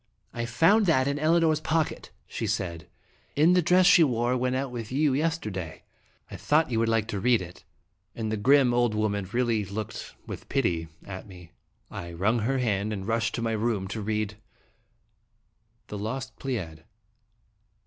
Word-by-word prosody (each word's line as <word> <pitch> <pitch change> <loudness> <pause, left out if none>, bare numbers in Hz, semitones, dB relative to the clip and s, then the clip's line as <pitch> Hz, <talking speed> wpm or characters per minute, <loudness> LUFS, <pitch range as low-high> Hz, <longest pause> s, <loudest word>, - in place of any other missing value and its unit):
" - - -46
I 120 0 -3
found 175 - +4
that 130 -5 +3
in 140 +1 -1
Elinor's 160 0 +3
pocket," 160 0 -1 0.2
she 110 - -4
said, 90 -6 -3 0.5
"in 160 +5 +5
the 180 - +4
dress 180 +2 +4
she 180 -2 +7
wore 120 -3 +1
when 125 0 0
out 135 0 -2
with 115 -2 -6
you 145 +1 +2
yesterday. 120 - -2 0.5
I - - -6
thought 150 -2 +2
you 115 - +1
would 115 0 +1
like 115 -1 +1
to 100 - -2
read 120 +2 +3
i22 - - -5
(l)e - - -7
Dramatic 90 - -17
in - - -35
it.*' - - -9
And 110 - -2
the 110 - -1
grim, 130 +3 +4
old 120 -3 +2
woman 100 -3 -1
really 120 -3 +1
looked 105 +3 -6
with - - -8
pity 85 -12 0 0.2
at 95 +1 -8
me. 90 -3 -13 0.4
I 85 0 -7
wrung 105 +8 +1
her 130 +5 0
hand, 110 -4 0
and 95 -2 -5
rushed 115 0 0
to 115 - -3
my 115 - 0
room 110 -3 -1
to 110 +2 -4
read: 105 0 -2 1.5
THE 105 - -5
LOST 120 +6 -4
PLEIAD. 90 - -4
115 Hz, 190 wpm, -27 LUFS, 105-135 Hz, 1.5 s, she